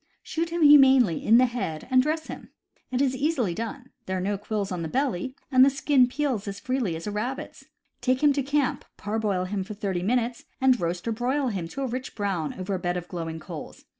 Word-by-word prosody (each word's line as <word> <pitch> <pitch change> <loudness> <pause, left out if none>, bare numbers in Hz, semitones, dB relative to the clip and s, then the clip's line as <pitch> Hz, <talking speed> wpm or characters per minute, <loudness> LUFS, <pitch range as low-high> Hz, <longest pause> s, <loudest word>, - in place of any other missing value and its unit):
Shoot 330 +1 -2
him 340 -1 0
humanely 270 - +6
in 225 +2 +6
the 255 - +6
head, 230 -11 -4
and 255 0 +6
dress 310 +3 -1
him. - - -9 0.4
It 255 +2 +1
is 260 -2 +1
easily 260 - 0
done; 245 +6 -6 0.2
there 190 0 -1
are - - -1
no 200 +3 -1
quills 205 0 -3
on 180 -2 -3
the 165 - -3
belly, 260 - -1 0.2
and 255 -1 +7
the 275 - +7
skin 275 -2 +3
peels 255 -6 -2
as 195 0 -5
freely 255 -9 -1
as 165 - -7
a 210 - -3
rabbit's. 240 +6 -5 0.4
Take 255 +2 +1
him 290 -1 +6
to 280 - 0
camp, 280 0 0
parboil 205 -3 -1
him 195 +1 -2
for 210 +2 -8
thirty 195 -3 -2
minutes, 235 +4 -1
and 260 -2 +3
roast 175 +4 -2
or - - +1
broil 255 +4 0
him 185 -6 -3
to 275 +11 -5
a - - 0
rich 255 +1 -5
brown 195 -7 -2
over 190 +1 -4
a 185 - -1
bed 175 0 -1
of 175 0 -6
glowing 165 -2 -5
coals. 155 - -9
235 Hz, 225 wpm, -26 LUFS, 190-265 Hz, 0.4 s, and